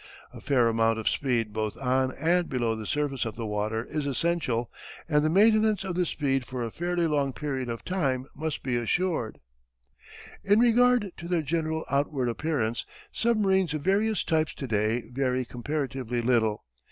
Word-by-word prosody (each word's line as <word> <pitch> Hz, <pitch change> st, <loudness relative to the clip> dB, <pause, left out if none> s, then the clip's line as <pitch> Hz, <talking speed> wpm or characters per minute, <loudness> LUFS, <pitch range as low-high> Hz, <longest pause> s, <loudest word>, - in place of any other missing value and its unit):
A -, -, -10 dB
fair 125 Hz, -4 st, +3 dB
amount 115 Hz, 0 st, +2 dB
of 110 Hz, -, -4 dB
speed 120 Hz, -6 st, 0 dB
both 110 Hz, -1 st, -2 dB
on 130 Hz, 0 st, +1 dB
and 170 Hz, +3 st, +2 dB
below 120 Hz, -4 st, 0 dB
the 110 Hz, -1 st, -6 dB
surface 145 Hz, -2 st, -1 dB
of 115 Hz, -2 st, -4 dB
the 115 Hz, -1 st, -4 dB
water 110 Hz, +2 st, -2 dB
is 150 Hz, -2 st, -3 dB
essential 135 Hz, -5 st, 0 dB, 0.4 s
and 150 Hz, -2 st, +3 dB
the 155 Hz, -, +2 dB
maintenance 215 Hz, +2 st, +4 dB
of 190 Hz, -2 st, -3 dB
the 180 Hz, 0 st, 0 dB
speed 135 Hz, -4 st, 0 dB
for 125 Hz, 0 st, -5 dB
a 115 Hz, -, -4 dB
fairly 175 Hz, +3 st, -1 dB
long 145 Hz, -4 st, +1 dB
period 135 Hz, -4 st, -3 dB
of 115 Hz, -1 st, -5 dB
time 135 Hz, -9 st, 0 dB
must 155 Hz, +1 st, -4 dB
be 130 Hz, -2 st, -1 dB
assured. 140 Hz, 0 st, -1 dB, 1.0 s
In 205 Hz, +2 st, +4 dB
regard 240 Hz, -3 st, +4 dB
to 170 Hz, -, -7 dB
their 175 Hz, -2 st, 0 dB
general 160 Hz, +1 st, -1 dB
outward 140 Hz, -2 st, 0 dB
appearance, 120 Hz, -4 st, -1 dB, 0.3 s
submarines 190 Hz, -8 st, +2 dB
of 150 Hz, -, -4 dB
various 210 Hz, +3 st, +2 dB
types 160 Hz, -2 st, 0 dB
to 135 Hz, -, -5 dB
day 110 Hz, +2 st, 0 dB
vary 130 Hz, -1 st, 0 dB
comparatively 125 Hz, -2 st, -3 dB
little. 110 Hz, -, +1 dB
140 Hz, 170 wpm, -27 LUFS, 120-170 Hz, 1.0 s, maintenance